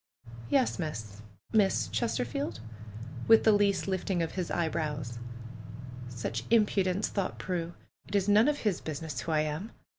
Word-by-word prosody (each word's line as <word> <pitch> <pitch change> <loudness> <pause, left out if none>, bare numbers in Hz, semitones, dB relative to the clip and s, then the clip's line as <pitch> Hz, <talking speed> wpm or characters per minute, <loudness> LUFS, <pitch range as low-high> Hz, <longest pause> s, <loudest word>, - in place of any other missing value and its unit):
"Yes, 260 -7 +2
Miss 110 - -5
— - - -35
Miss 205 - +3
Chesterfield?" 115 +3 -1 0.7
with 225 0 +7
the 220 - +6
least 205 -1 +3
lift 190 0 -2
ing 175 -3 +2
of 165 - -3
his 180 -2 -3
eyebrows. 150 -7 -2 0.5
" 125 +2 -11
Such 120 -1 -3
impudence 205 -3 +3
I" - - -16
thought 195 -3 -1
Prue. 175 -2 -3 0.3
"It - - -4
is 200 -1 +2
none 210 +4 +6
of 295 -1 +1
his 210 -5 0
business 155 -3 -4
who 165 - -3
I 155 -1 +3
am 155 +8 -3
!" - - -33
165 Hz, 175 wpm, -30 LUFS, 125-200 Hz, 0.7 s, with